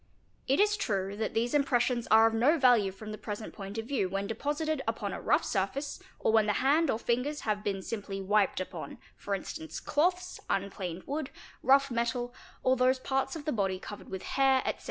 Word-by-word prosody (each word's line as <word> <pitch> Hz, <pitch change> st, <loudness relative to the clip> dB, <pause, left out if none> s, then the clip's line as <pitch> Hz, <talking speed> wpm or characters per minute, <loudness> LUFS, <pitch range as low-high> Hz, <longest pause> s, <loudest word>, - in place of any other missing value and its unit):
It 270 Hz, +2 st, +2 dB
is 415 Hz, 0 st, +4 dB
true 195 Hz, -, -1 dB
that 220 Hz, 0 st, -2 dB
these 235 Hz, +2 st, +1 dB
impressions 250 Hz, -4 st, +2 dB
are 220 Hz, +1 st, +7 dB
of 225 Hz, -, +3 dB
no 260 Hz, +9 st, +4 dB
value 245 Hz, -8 st, +4 dB
from 215 Hz, +3 st, -9 dB
the 215 Hz, -, -7 dB
present 210 Hz, 0 st, -6 dB
point 200 Hz, +1 st, -7 dB
of 225 Hz, -, -3 dB
view 235 Hz, -7 st, 0 dB
when 195 Hz, +1 st, -2 dB
deposited 295 Hz, +7 st, -2 dB
upon 210 Hz, -3 st, -2 dB
a -, -, -5 dB
rough -, -, +2 dB
surface 240 Hz, -, -2 dB, 0.2 s
or -, -, +2 dB
when 220 Hz, -1 st, +4 dB
the 210 Hz, -, +3 dB
hand 285 Hz, +7 st, +3 dB
or 220 Hz, -, +2 dB
fingers 250 Hz, +6 st, -1 dB
have 210 Hz, -1 st, -1 dB
been 195 Hz, -2 st, -2 dB
simply 200 Hz, -2 st, -4 dB
wiped 200 Hz, 0 st, +2 dB
upon 185 Hz, -, -6 dB, 0.2 s
for 200 Hz, -, -3 dB
instance, 315 Hz, +10 st, -6 dB
cloths, 360 Hz, +4 st, 0 dB
un 195 Hz, 0 st, 0 dB
planed 180 Hz, -2 st, -5 dB
wood, 285 Hz, 0 st, -3 dB, 0.3 s
rough 275 Hz, 0 st, +4 dB
metal, 240 Hz, +1 st, -1 dB, 0.3 s
or 260 Hz, 0 st, +4 dB
those 255 Hz, +1 st, +3 dB
parts 270 Hz, +2 st, -1 dB
of 305 Hz, -3 st, -7 dB
the 305 Hz, -, 0 dB
body 195 Hz, -5 st, 0 dB
covered 205 Hz, +2 st, -9 dB
with 190 Hz, -1 st, -5 dB
hair, 265 Hz, -1 st, +3 dB
etc. -, -, -1 dB
235 Hz, 205 wpm, -30 LUFS, 205-275 Hz, 0.3 s, are